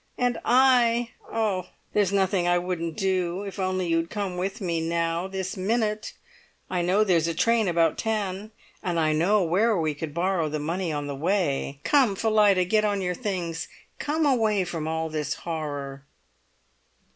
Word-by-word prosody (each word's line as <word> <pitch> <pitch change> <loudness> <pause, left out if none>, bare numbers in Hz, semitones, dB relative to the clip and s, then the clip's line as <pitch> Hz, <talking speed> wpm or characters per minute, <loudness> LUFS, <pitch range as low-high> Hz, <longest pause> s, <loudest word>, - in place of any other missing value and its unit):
And 245 -1 0
I, 240 -2 +4 0.2
oh! 205 -5 -1 0.3
there's 205 -3 +2
nothing 190 -2 +1
I 175 0 +4
wouldn't 175 -2 -3
do 185 -1 0
if 200 0 -7
only 185 -1 0
you'd 165 0 0
come 200 -3 -3
with 190 +4 -3
me 170 -5 -1
now 170 +1 -1
this 190 -1 -4
minute! 215 +2 -1 0.6
I 180 -1 0
know 185 +5 +3
there's 170 -5 +2
a 165 - -2
train 230 +3 +2
about 165 -2 +2
ten, 210 -2 -2 0.3
and 175 -2 -1
I 155 -1 +2
know 185 +6 +3
where 200 +6 +2
we 155 -2 0
could 150 0 -6
borrow 175 -2 0
the 155 - -2
money 165 +4 -2
on 145 -1 -3
the 145 - -4
way. 145 -3 -1
Come, 260 -9 +3
Phillida, 205 -3 +3
get 215 +4 +2
on 205 -2 0
your 180 0 0
things 175 -6 -3
and - - -25
come 310 +2 0
away 220 -8 +2
from 165 -3 -4
all 160 0 -1
this 150 -2 -3
horror!" 145 -4 -5
185 Hz, 170 wpm, -26 LUFS, 165-210 Hz, 0.6 s, I